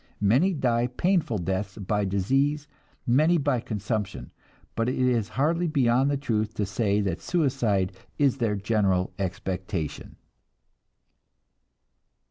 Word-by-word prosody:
Many 130 - +3
die 120 -4 +1
painful 165 - 0
deaths 95 +2 -3
by 105 0 -1
disease, 135 +10 0 0.4
many 155 +8 +4
by 140 -4 +1
consumption, 105 - -4 0.4
but 115 +2 0
it 130 - -1
is 125 -5 +1
hardly 165 +5 +2
beyond 135 -3 +2
the 145 - +1
truth 110 -5 -1
to 105 - 0
say 105 0 0
that 95 -3 -2
suicide 120 - +1 0.3
is 140 -3 +2
their 110 -4 +1
general 100 -3 +1
expectation." 95 -3 -4
115 Hz, 115 wpm, -26 LUFS, 100-135 Hz, 0.4 s, many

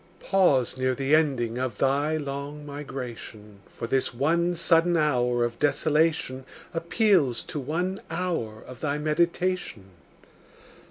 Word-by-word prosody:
Pause 140 -10 +2
near 130 0 +1
the 135 +2 0
ending 130 -7 +2
of 130 -5 -3
thy 145 +3 +1
long 145 0 -5
migration; 120 -7 -8
For - - -7
this 130 +2 0
one 170 +7 +1
sudden 170 0 +3
hour 125 -5 +2
of 120 0 -5
desolation 150 -2 +1 0.3
Appeals 170 - +2
to 150 - -5
one 175 +8 -2
hour 160 -12 -3
of 125 - -11
thy 145 -1 -1
meditation. 155 - -1
145 Hz, 120 wpm, -26 LUFS, 125-165 Hz, 0.3 s, sudden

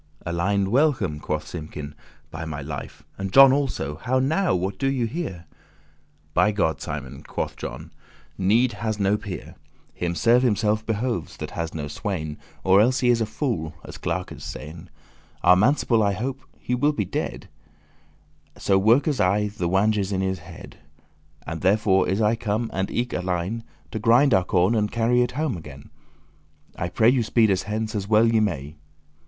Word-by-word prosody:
"Alein, 95 +3 0
welcome," 120 - +2
quoth 75 0 -3
Simkin, 75 -3 -7 0.4
"by 80 0 -6
my 80 -3 -5
life, 70 0 -7 0.2
And 95 -1 -3
John 135 +2 +8
also: 130 - -1
how 125 +10 0
now, 160 - +2
what 95 +2 -2
do 135 - +1
ye 130 -3 0
here?" 110 - -5 0.9
"By 105 - +4
God, 80 -7 0
Simon," 65 -3 -6
quoth - - -4
John, - - -8 0.4
"need 115 +6 +3
has 110 -2 -3
no 100 +1 +2
peer*. 105 -3 -7
*equal 90 - -9
Him 85 - -2
serve 115 +8 +4
himself 110 -2 +1
behoves 115 +2 -2
that - - -6
has 85 -1 -4
no 75 -2 -3
swain*, 80 -4 -4
*servant - - -27
Or 95 +2 +5
else 125 +3 +2
he 125 - +3
is 120 -1 +3
a 110 - 0
fool, 105 - -3
as - - -9
clerkes 90 +1 -4
sayn. 80 +4 -8 0.5
Our 90 +1 +7
manciple 115 +2 +3
I 100 -1 +2
hope* 130 +7 -4 0.2
he 125 - -3
will 145 +5 +2
be 105 -8 -1
dead, - - -4 1.1
*expect - - -17
So 95 -1 +4
workes 130 +8 +3
aye 105 +3 +2
the 90 -5 -1
wanges* 100 +1 +1
in 95 -1 0
his 95 -1 -1
head: - - -12
*cheek - - -30
teeth - - -34
<8> - - -25
And 80 +2 -5
therefore 95 0 +3
is 95 +4 0
I 105 +2 +3
come, 110 +1 -2
and 95 0 -1
eke 120 +1 -2
Alein, 90 +4 -2 0.3
To - - -3
grind 120 +4 +4
our 95 -2 +3
corn 90 +4 +2
and 105 -2 0
carry 120 +1 +2
it 125 0 0
home 150 -3 -1
again: 75 -5 -11 0.8
I 85 - -3
pray 110 +5 +4
you 125 -1 +3
speed 110 -1 +3
us 95 -1 +1
hence 110 +1 -2
as 100 -2 -3
well 110 +1 +5
ye 115 -1 +3
may." 75 -9 -2
105 Hz, 185 wpm, -24 LUFS, 90-120 Hz, 1.1 s, John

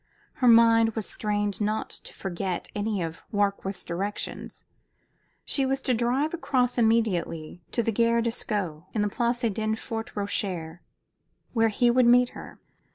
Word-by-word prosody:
Her 250 - +1
mind 230 -1 +6
was 220 -3 -3
strained 205 -1 -2
not 215 +1 -1
to - - -9
forget 185 -1 -3
any 205 -3 -1
of 165 0 -6
Warkworth's 200 -2 -1
directions. 195 +5 -5 0.8
She 275 - +1
was 270 0 +1
to 255 - +2
drive 250 +7 +1
across 255 -7 0
immediately 185 -8 0
to 235 - 0
the 225 - 0
Gare 230 +2 +2
de 235 - 0
Sceaux, 185 -8 -3
in 210 - +2
the 210 - 0
Place 240 +2 -1
Denfert 220 +1 -2
Rochereau, 185 -5 -3 0.7
where 225 -2 +3
he 240 +3 +3
would 250 0 +4
meet 245 +1 +6
her. - - -11
220 Hz, 150 wpm, -26 LUFS, 200-235 Hz, 0.8 s, mind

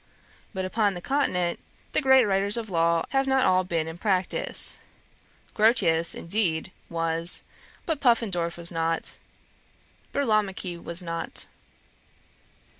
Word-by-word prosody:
But 190 -3 -3
upon 205 0 +1
the - - -5
Continent, 180 -8 0 0.3
the - - +1
great 265 -3 +6
writers 200 +1 +2
on 230 - -3
law 170 -3 +1
have 270 0 +1
not 265 -1 +3
all 185 0 +3
been 165 -3 -1
in 160 +1 -7
practice: 190 -3 0 0.7
Grotius, 185 -8 +3
indeed, 170 -2 -1 0.2
was; 165 +1 -1 0.4
but 320 -4 -1
Puffendorf 195 -9 +1
was 170 0 -3
not, 165 0 -1 0.9
Burlamaqui 205 -8 0
was 170 +2 -2
not.' 165 -1 -1
185 Hz, 115 wpm, -26 LUFS, 170-220 Hz, 0.9 s, great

